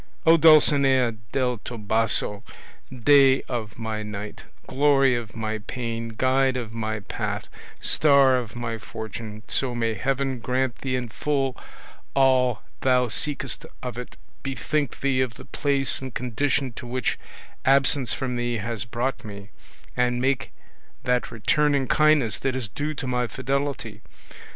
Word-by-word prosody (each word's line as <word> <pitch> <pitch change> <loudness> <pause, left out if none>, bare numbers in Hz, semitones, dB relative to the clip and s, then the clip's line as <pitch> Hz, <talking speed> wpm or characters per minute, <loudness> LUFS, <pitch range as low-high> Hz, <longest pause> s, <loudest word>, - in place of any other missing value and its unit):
Oh, 165 - +8
Dulcinea 140 -6 +5 0.2
del 125 -3 0
Toboso, 110 -2 0 0.5
day 135 +1 +5
of 110 -5 -5
my 110 -2 -3
night, 105 0 -7 0.2
glory 135 -1 +3
of 120 -3 -4
my 110 -1 -3
pain, 115 +1 -4
guide 130 0 +2
of 115 -3 -5
my 110 -1 -3
path, - - -4 0.3
star 140 -3 +4
of 120 -4 -3
my 115 -2 -4
fortune, 110 0 -7
so 130 -3 -1
may 115 -1 0
Heaven 135 +1 -1
grant 125 +1 -1
thee 130 -1 -2
in 125 -2 -3
full 135 +1 -1 0.6
all 130 -5 +3 0.2
thou 125 -2 +2
seekest 135 +1 -2 0.2
of 125 -3 -4
it, 125 0 -8 0.3
bethink 140 0 -2
thee 135 -2 +2
of 125 -3 -2
the - - -12
place 140 -2 +1
and 130 -2 -7
condition 130 +2 0
to 120 +2 -9
which 125 +1 -1 0.4
absence 135 -2 +3
from 125 -2 -2
thee 120 -1 -1
has 110 -1 -3
brought 120 +4 -3
me, 100 -1 -10 0.4
and 125 0 +1
make 130 +1 0 0.5
that 125 0 0
return 145 +6 +2
in 135 -1 +1
kindness 145 -11 +3
that 135 -1 -1
is 130 -4 -3
due 150 +8 -3
to 135 - -5
my 125 -1 0
fidelity! 135 -4 -3
125 Hz, 145 wpm, -24 LUFS, 115-135 Hz, 0.6 s, Oh